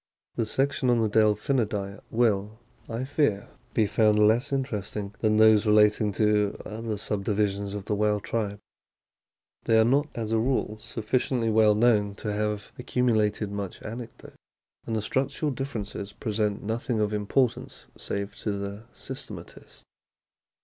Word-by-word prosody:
The 115 Hz, -, -1 dB
section 135 Hz, +1 st, +1 dB
on 120 Hz, -1 st, +4 dB
the 110 Hz, -, +2 dB
Delphinidae 105 Hz, -1 st, +1 dB
will, 110 Hz, -2 st, +1 dB, 0.3 s
I 115 Hz, +2 st, -3 dB
fear, 130 Hz, -7 st, 0 dB, 0.3 s
be 110 Hz, -, +4 dB
found 105 Hz, +1 st, +3 dB
less 110 Hz, +5 st, +3 dB
interesting 105 Hz, -6 st, -3 dB
than 110 Hz, -1 st, +2 dB
those 110 Hz, 0 st, +6 dB
relating 105 Hz, 0 st, +4 dB
to 105 Hz, -1 st, +2 dB
other 110 Hz, 0 st, -4 dB
subdivisions 100 Hz, 0 st, -1 dB
of 100 Hz, -1 st, -6 dB
the 105 Hz, -, -1 dB
whale 105 Hz, 0 st, +1 dB
tribe. 105 Hz, -1 st, -3 dB, 1.1 s
They 110 Hz, 0 st, +4 dB
are 110 Hz, -, +5 dB
not, 140 Hz, +5 st, +3 dB
as 110 Hz, -2 st, -3 dB
a 115 Hz, -, +3 dB
rule, 110 Hz, -3 st, -1 dB
sufficiently 115 Hz, +1 st, -1 dB
well 110 Hz, -1 st, +5 dB
known 105 Hz, -3 st, +3 dB
to 105 Hz, 0 st, -4 dB
have 105 Hz, 0 st, -2 dB
accumulated 110 Hz, -5 st, +1 dB
much 100 Hz, -2 st, -5 dB
anecdote; 115 Hz, +1 st, -8 dB, 0.5 s
and 115 Hz, -, -1 dB
the 110 Hz, -, -1 dB
structural 135 Hz, +5 st, -1 dB
differences 110 Hz, -7 st, -5 dB
present 105 Hz, -2 st, -2 dB
nothing 115 Hz, +2 st, -2 dB
of 105 Hz, 0 st, 0 dB
importance 110 Hz, +4 st, -1 dB
save 100 Hz, 0 st, -4 dB
to 105 Hz, -, -2 dB
the 100 Hz, +2 st, -5 dB
systematist. -, -, -9 dB
110 Hz, 140 wpm, -27 LUFS, 105-115 Hz, 1.1 s, those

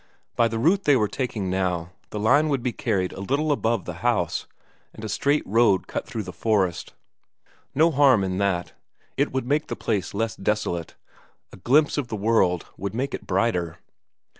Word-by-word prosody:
By 115 Hz, -, +4 dB
the 115 Hz, 0 st, -3 dB
route 175 Hz, -, +2 dB
they 145 Hz, -, +5 dB
were 110 Hz, -4 st, +2 dB
taking 105 Hz, -6 st, -3 dB
now, 90 Hz, -2 st, -1 dB, 0.2 s
the 105 Hz, -, -5 dB
line 145 Hz, +9 st, +4 dB
would 135 Hz, -4 st, 0 dB
be 125 Hz, -, 0 dB
carried 95 Hz, -6 st, -1 dB
a -, -, -9 dB
little 145 Hz, +9 st, 0 dB
above 115 Hz, -5 st, 0 dB
the -, -, -5 dB
house, 115 Hz, -8 st, 0 dB, 0.5 s
and 110 Hz, -, -8 dB
a -, -, -3 dB
straight 140 Hz, +8 st, +1 dB
road 105 Hz, -3 st, +3 dB
cut -, -, -5 dB
through 110 Hz, -, -4 dB
the 90 Hz, -1 st, -8 dB
forest. 95 Hz, -6 st, 0 dB, 0.8 s
No 160 Hz, +4 st, +4 dB
harm 135 Hz, -7 st, +5 dB
in 95 Hz, 0 st, -2 dB
that. 95 Hz, -3 st, -1 dB, 0.4 s
It -, -, +1 dB
would 130 Hz, -1 st, -2 dB
make 145 Hz, +4 st, 0 dB
the -, -, -4 dB
place 100 Hz, -1 st, -2 dB
less 115 Hz, +1 st, -1 dB
desolate, 85 Hz, -6 st, -2 dB, 0.6 s
a -, -, -10 dB
glimpse 145 Hz, +9 st, +3 dB
of 135 Hz, -, -3 dB
the 110 Hz, -, -4 dB
world 100 Hz, -5 st, +2 dB
would 100 Hz, +2 st, -4 dB
make 135 Hz, +3 st, -2 dB
it -, -, -6 dB
brighter. 90 Hz, -4 st, 0 dB
110 Hz, 190 wpm, -24 LUFS, 95-130 Hz, 0.8 s, they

